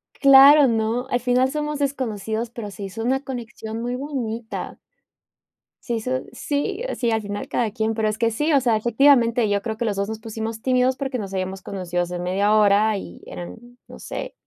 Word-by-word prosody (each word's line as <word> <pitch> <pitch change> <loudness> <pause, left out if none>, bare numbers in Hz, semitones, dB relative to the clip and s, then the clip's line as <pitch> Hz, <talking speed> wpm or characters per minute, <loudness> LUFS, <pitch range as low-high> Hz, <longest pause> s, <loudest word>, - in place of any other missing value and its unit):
Claro, 275 +1 +8
¿no?, 230 +2 0
al 245 - +1
final 250 +2 +2
somos 300 -1 -3
desconocidos, 230 -5 -2
pero 220 -3 -7
se 200 - -8
hizo 210 +4 -5
una 265 +3 0
conexión 230 -3 -6
muy 245 +1 -2
bonita. 240 -5 -5 1.1
Se 240 - -2
hizo 255 +3 -1
sí, 340 +9 -2 0.2
sí, 235 -2 0
al 220 -1 +1
final 205 0 -5
cada 225 -4 -1
quien, 220 0 -1
pero 220 -1 0
es 215 - -3
que 230 0 +1
sí, 295 +8 0
o 280 - +5
sea, 240 -3 +2
efectivamente, 235 0 +3
yo 200 0 +1
creo 220 0 -4
que 235 - -2
los 210 - -1
2 200 +1 -2
nos 220 0 -5
pusimos 220 0 -5
tímidos 255 +1 +2
porque 270 -2 -3
nos 195 -2 -6
habíamos 190 0 -3
conocido 180 -2 -3
hace 175 0 -5
media 195 +4 +1
hora, 210 0 +4
y 85 - -9
eran, 90 0 -8 0.3
no - - -12
sé - - -6
225 Hz, 195 wpm, -22 LUFS, 210-255 Hz, 1.1 s, Claro